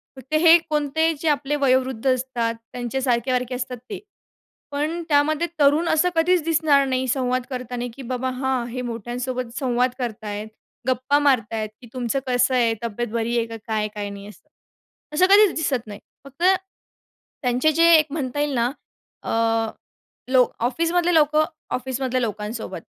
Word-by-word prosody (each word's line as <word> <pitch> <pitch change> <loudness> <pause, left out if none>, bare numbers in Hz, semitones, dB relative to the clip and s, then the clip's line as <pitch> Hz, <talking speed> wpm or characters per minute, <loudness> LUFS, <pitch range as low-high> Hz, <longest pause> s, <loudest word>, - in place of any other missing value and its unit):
फक्त 265 +3 -11
हे 335 0 +8
कोणते 305 +2 +1
जे 325 - -3
आपले 290 0 0
वयोवृद्ध 260 -2 +1
असतात, 245 -3 -2 0.2
त्यांच्या 245 +2 -3
सारखे-वारखे 250 0 0
असतात 250 0 -4
ते. 395 - -5 0.7
पण 310 +4 -2
त्यामध्ये 300 +3 +2
तरुण 295 +4 +4
असं 340 +3 +3
कधीच 340 0 +3
दिसणार 310 -4 +3
नाही 260 0 -1
संवाद 255 -1 0
करताना 250 -1 -4
की 275 - -9
"बाबा, 255 +1 -1
हां 260 -1 -1
हे 250 +1 -4
मोठ्यांसोबत 240 +2 -4
संवाद 250 -1 +1
करत 230 -3 -4
आहेत, 210 +1 -4 0.4
गप्पा 260 +3 +2
मारत 255 -7 +2
आहेत 215 -1 -2
की 240 - -12
तुमचं 250 +1 -1
कसं 250 +1 +2
आहे? 235 -2 +3
तब्येत 235 +1 -3
बरी 235 +1 0
आहे 230 - +1
का 225 0 -7
काय? 215 -1 0
काय 205 -1 -4
नाही," 200 0 -9
असं. 210 - -15 0.7
असं 350 +5 +4
कधीच 405 -2 +6
दिसत 260 -8 -1
नाही. 205 -1 -8 0.3
फक्त 275 +5 -8 1.0
त्यांचे 255 +4 +2
जे 335 +2 +5
एक 310 - +5
म्हणता 290 -2 -3
येईल 290 -1 0
ना 240 +1 +1 0.5
अ, - - -6 1.0
लोक 255 -2 +4
ऑफिसमधले 335 +7 +1
लोकं 310 -1 +4 0.3
ऑफिसमधल्या 255 0 -2
लोकांसोबत, 215 +1 -4
255 Hz, 155 wpm, -23 LUFS, 240-295 Hz, 1.0 s, हे